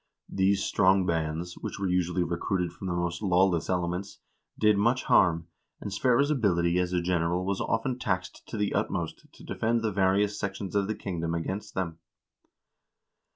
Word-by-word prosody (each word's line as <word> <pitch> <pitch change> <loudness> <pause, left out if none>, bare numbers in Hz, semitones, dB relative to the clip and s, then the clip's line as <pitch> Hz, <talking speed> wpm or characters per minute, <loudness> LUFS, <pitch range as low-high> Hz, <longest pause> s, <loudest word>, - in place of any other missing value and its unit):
These 95 0 +2
strong 95 -1 +3
bands, 80 +1 -2
which - - -5
were 100 -1 -1
usually 90 0 +1
recruited 85 +1 -1
from 95 - -7
the 90 - -1
most 85 +1 -2
lawless 90 -3 +2
elements, 90 +1 -2 0.4
did 105 -1 +4
much 120 +6 +2
harm, 85 -2 +3 0.3
and 100 - -6
Sverre's 130 +7 +3
ability 90 - +2
as 90 0 0
a 90 -1 0
general 90 0 0
was 100 0 -1
often 125 +3 -1
taxed 95 -5 -2
to 115 - -5
the 105 -1 0
utmost 100 -5 -3
to - - -16
defend 115 +1 0
the 110 - +1
various 100 +2 +2
sections 95 -1 -4
of 100 -1 +2
the 110 - -2
kingdom 85 -5 -3
against 95 +5 -4
them. 85 -3 -3
95 Hz, 165 wpm, -28 LUFS, 85-100 Hz, 0.4 s, did